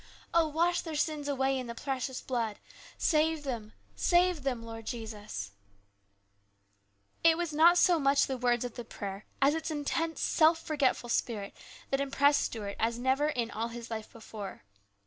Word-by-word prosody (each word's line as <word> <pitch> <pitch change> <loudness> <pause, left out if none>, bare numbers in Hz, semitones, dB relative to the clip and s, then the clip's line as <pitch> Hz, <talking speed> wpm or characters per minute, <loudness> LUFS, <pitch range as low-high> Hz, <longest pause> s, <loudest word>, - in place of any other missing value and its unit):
Oh, 335 -1 +4
wash 340 +3 +1
their 320 -2 -6
sins 300 -1 -1
away 270 -1 +1
in 250 - -5
the 235 - -6
precious 265 0 -3
blood! 230 -5 -2 0.4
Save 315 -1 +2
them, 230 -6 -5 0.2
save 355 -2 +3
them, 255 -4 -2
Lord 225 -1 -8
Jesus! 210 - -5 0.9
" 100 0 -42
It 330 -1 +6
was 340 -3 -2
not 335 +4 +6
so 350 -1 +5
much 275 0 +4
the 265 - -3
words 245 -1 +1
of 245 - -5
the 240 - -6
prayer 200 -2 -7 0.2
as 280 +2 +5
its 320 +1 -3
intense 320 +2 -2
self 320 0 +4
forgetful 280 -6 0
spirit 210 -4 -1 0.4
that 270 0 +1
impressed 280 +1 +3
Stuart 205 -3 -4
as 230 +1 +1
never 260 +4 +2
in 240 -6 -1
all 225 +2 -2
his 235 0 -8
life 220 -1 -5
before. 210 - -8
260 Hz, 165 wpm, -30 LUFS, 225-305 Hz, 0.9 s, It